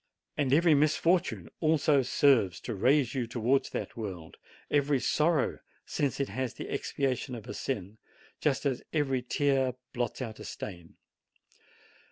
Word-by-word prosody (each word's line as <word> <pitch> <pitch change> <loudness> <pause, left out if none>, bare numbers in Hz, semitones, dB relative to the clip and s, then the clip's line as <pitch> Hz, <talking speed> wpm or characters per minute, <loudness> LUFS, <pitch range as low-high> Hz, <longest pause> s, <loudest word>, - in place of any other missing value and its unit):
And 140 -3 0
every 165 +3 +5
misfortune, 150 - +2
also, 155 -2 +3
serves 125 -8 +3
to 120 - -4
raise 130 +6 +3
you 125 -4 -1
towards 120 +3 +1
that - - -5
world; 95 -8 -7 0.3
every 145 -1 +3
sorrow, 155 +1 +1 0.3
since 140 -3 -1
it 140 - -1
is 130 -2 -3
the - - -7
expiation 130 -1 -2
of 115 - -9
a - - -5
sin, 105 -3 -4 0.4
just 145 -1 0
as 135 -3 0
every 135 -5 +1
tear 135 0 +1 0.2
blots 120 -2 -2
out 115 -4 -5
a - - -8
stain. 85 -4 -8
130 Hz, 145 wpm, -30 LUFS, 115-145 Hz, 0.4 s, every